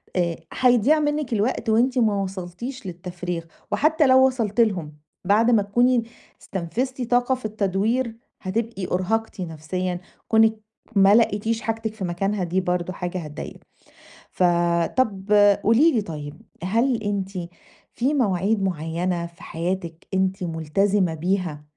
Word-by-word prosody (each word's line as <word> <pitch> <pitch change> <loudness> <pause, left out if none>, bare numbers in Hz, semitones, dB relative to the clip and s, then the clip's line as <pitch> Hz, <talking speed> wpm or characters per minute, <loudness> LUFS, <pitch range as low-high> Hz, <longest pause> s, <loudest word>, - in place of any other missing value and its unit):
آآ 170 -2 +1 0.2
هيضيّع 250 +4 +4
منِّك 295 -4 -1
الوقت 225 +2 0
وأنتِ 245 +4 +3
ما 215 -4 +2
وصلتيش 195 +7 -6
للتفريغ 175 -1 -5 0.3
وحتّى 310 +1 +3
لو 260 0 +6
وصلتِ 235 -4 0
لهم، 180 -9 0 0.3
بعد 220 +5 +4
ما 225 -3 +5
تكوني 240 +4 +2 0.4
استنفذتِ 245 +9 -3
طاقة 245 +2 +2
في 255 - -11
التدوير، 215 +3 0 0.3
هتبقي 215 0 -3
أُرهَقتِ 205 +3 -1
نَفْسيًا، 180 +2 -3 0.3
كُونِك 220 -1 +4 0.4
ما 195 +1 +6
لقيتيش 225 0 +2
حاجتِك 225 0 -3
في 220 - -7
مكانها، 195 +3 -1
دي 180 +2 0
برضه 180 0 -1
حاجة 180 +1 -4
هتضايقِك. 150 -3 -8 0.7
ف 185 - -1 0.5
طَب 205 -5 0 0.3
قولي 255 +10 +5
لي 230 - +1
طيب، 150 -5 -7 0.2
هل 230 +5 +1
أنتِ 200 -2 -2 0.6
في 265 +5 0
مواعيد 205 - +1
معيّنة 170 0 -1
في 170 0 -13
حياتِك 170 0 -4
أنتِ 190 0 0
ملتزمة 175 +3 +1
بيها 175 -2 -2
200 Hz, 130 wpm, -23 LUFS, 180-230 Hz, 0.7 s, لو